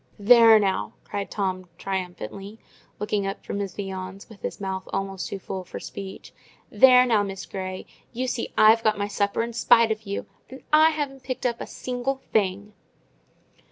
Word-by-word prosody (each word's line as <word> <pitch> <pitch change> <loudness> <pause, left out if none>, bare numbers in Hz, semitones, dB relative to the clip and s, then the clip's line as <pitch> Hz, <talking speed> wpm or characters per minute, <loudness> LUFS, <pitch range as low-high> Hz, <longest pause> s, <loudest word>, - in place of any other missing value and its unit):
"There 225 +1 +7
now," 195 -3 0
cried 200 -1 -5
Tom, 185 -3 -3
triumphantly, 190 - -5 0.4
looking 205 -1 -1
up 195 - -6
from 200 - -4
his 200 -2 -4
viands 190 0 -6
with 220 -3 -14
his - - -5
mouth 190 -1 -4
almost 195 -1 -3
too 200 - -4
full 190 0 -6
for - - -8
speech. 195 -1 -9 0.4
"There 255 -1 +7
now, 225 -4 +3
Miss 195 -1 -5
Grey! 185 -1 -6 0.3
you 250 +2 -3
see 245 -2 -3
I've 220 +1 +6
got 215 -1 +2
my 205 0 -1
supper 205 +1 0
in 235 0 -5
spite 230 -1 +4
of 215 -1 -4
you: 200 - -3 0.2
and 260 +1 -11
I 310 +1 +7
haven't 285 -4 -4
picked 255 0 -5
up 235 -1 -1
a - - -5
single 250 +2 -3 0.2
thing!" 200 0 0
205 Hz, 175 wpm, -25 LUFS, 195-235 Hz, 0.4 s, There